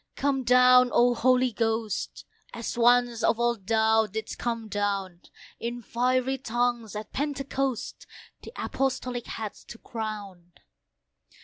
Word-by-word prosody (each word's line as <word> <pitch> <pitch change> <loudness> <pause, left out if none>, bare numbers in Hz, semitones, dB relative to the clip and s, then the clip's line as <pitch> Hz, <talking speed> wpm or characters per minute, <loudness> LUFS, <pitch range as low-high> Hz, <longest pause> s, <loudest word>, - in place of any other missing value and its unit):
come 275 -2 0
down! 250 0 +6
O 245 0 +4
Holy 255 +1 +3
Ghost! 225 -2 -2 0.3
As 235 - -4
once 240 0 +3
of 230 - +2
old 235 -5 0
Thou 220 0 +3
didst 215 +2 -6
come 230 -2 -3
down 195 -3 -2 0.4
In 240 +1 -5
fiery 255 +3 0
tongues 240 -3 -1
at 210 +1 -7
Pentecost, 275 -3 -3 0.3
The - - -10
Apostolic 255 - -2
heads 215 -2 -6
to 235 - -10
crown. 205 -7 -7
235 Hz, 120 wpm, -27 LUFS, 220-250 Hz, 0.4 s, down